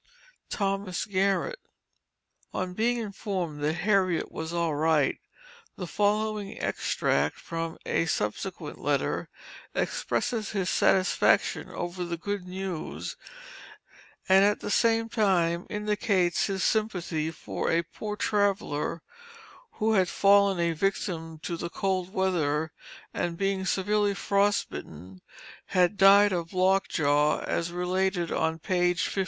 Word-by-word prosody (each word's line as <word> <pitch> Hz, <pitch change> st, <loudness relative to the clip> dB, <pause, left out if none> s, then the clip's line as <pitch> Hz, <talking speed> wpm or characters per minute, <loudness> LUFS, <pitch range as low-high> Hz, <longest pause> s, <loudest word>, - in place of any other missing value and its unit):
THOMAS 195 Hz, -2 st, -1 dB
GARRETT. 200 Hz, -, 0 dB, 1.0 s
On 185 Hz, -1 st, -2 dB
being 235 Hz, +5 st, +1 dB
informed 190 Hz, -8 st, -4 dB
that 150 Hz, +2 st, +1 dB
Harriet 190 Hz, -5 st, +2 dB
was 160 Hz, 0 st, -5 dB
"all 170 Hz, -2 st, 0 dB
right," 155 Hz, -1 st, +2 dB, 0.6 s
the 180 Hz, -, -5 dB
following 210 Hz, +2 st, -1 dB
extract -, -, 0 dB
from 165 Hz, -1 st, -4 dB
a 165 Hz, -, 0 dB
subsequent 160 Hz, -, -3 dB
letter, -, -, -1 dB, 0.5 s
expresses 225 Hz, -4 st, -1 dB
his 190 Hz, -3 st, 0 dB
satisfaction 190 Hz, -1 st, +2 dB
over 175 Hz, +1 st, -4 dB
the 170 Hz, -1 st, -3 dB
good 200 Hz, +1 st, -4 dB
news, 185 Hz, -2 st, -5 dB, 1.1 s
and 190 Hz, +1 st, +6 dB
at 205 Hz, +1 st, +3 dB
the -, -, -3 dB
same 225 Hz, 0 st, +3 dB
time, 180 Hz, -7 st, +1 dB
indicates 210 Hz, -4 st, +1 dB
his 195 Hz, -2 st, -2 dB
sympathy 180 Hz, -8 st, 0 dB
for 160 Hz, -, -4 dB
a 170 Hz, +1 st, +2 dB
"poor 210 Hz, +5 st, -6 dB
traveler," 200 Hz, -7 st, 0 dB, 0.7 s
who 220 Hz, -, +1 dB
had 185 Hz, -4 st, +3 dB
fallen 200 Hz, -1 st, +4 dB
a 170 Hz, 0 st, +2 dB
victim 165 Hz, -2 st, -2 dB
to 175 Hz, -, -3 dB
the 170 Hz, +1 st, -4 dB
cold 185 Hz, 0 st, -1 dB
weather, 160 Hz, -5 st, 0 dB, 0.4 s
and 170 Hz, -1 st, -2 dB
being 195 Hz, 0 st, 0 dB
severely 205 Hz, +1 st, +1 dB
frost 200 Hz, +1 st, +1 dB
bitten, 90 Hz, +4 st, -9 dB, 0.5 s
had 180 Hz, +1 st, +2 dB
died 200 Hz, +1 st, +7 dB
of 170 Hz, -2 st, -3 dB
lock 190 Hz, +1 st, +3 dB
jaw, 150 Hz, 0 st, +2 dB
as 170 Hz, 0 st, -2 dB
related 180 Hz, 0 st, 0 dB
on 160 Hz, 0 st, 0 dB
page 175 Hz, +1 st, +1 dB
52. -, -, -2 dB
185 Hz, 125 wpm, -27 LUFS, 170-200 Hz, 1.1 s, died